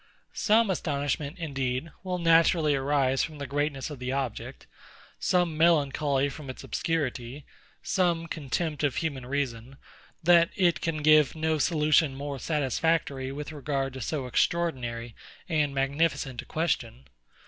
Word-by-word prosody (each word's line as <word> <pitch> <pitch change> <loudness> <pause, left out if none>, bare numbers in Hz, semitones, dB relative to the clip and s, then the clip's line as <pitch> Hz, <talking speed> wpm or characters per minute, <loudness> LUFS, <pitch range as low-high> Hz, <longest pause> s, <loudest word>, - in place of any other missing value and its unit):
Some 220 -1 +3
astonishment, 145 -2 -2
indeed, 135 -2 -3
will 185 -1 -2
naturally 165 -2 +4
arise 135 -1 +1
from 155 -2 -5
the 140 - -5
greatness 145 +1 -2
of 145 - -8
the 125 0 -3
object; 135 -4 -4 0.5
some 175 -3 +1
melancholy 145 -3 +2
from 140 -1 -8
its 130 - -7
obscurity; 140 -4 -3 0.4
some 175 -3 +1
contempt 155 0 -3
of 140 -4 +1
human 140 -7 -3
reason, 130 -2 -3 0.5
that 170 0 +6
it 175 -3 +2
can 155 -2 -2
give 155 -1 +5
no 160 0 0
solution 150 -3 +3
more 140 0 -5
satisfactory 145 -2 0
with 150 +2 -6
regard 140 -3 -2
to 130 - -7
so 140 +2 -2
extraordinary 125 -5 -1 0.3
and 150 -4 0
magnificent 135 -2 0
a - - -15
question. 125 - -2
145 Hz, 135 wpm, -27 LUFS, 135-165 Hz, 0.5 s, that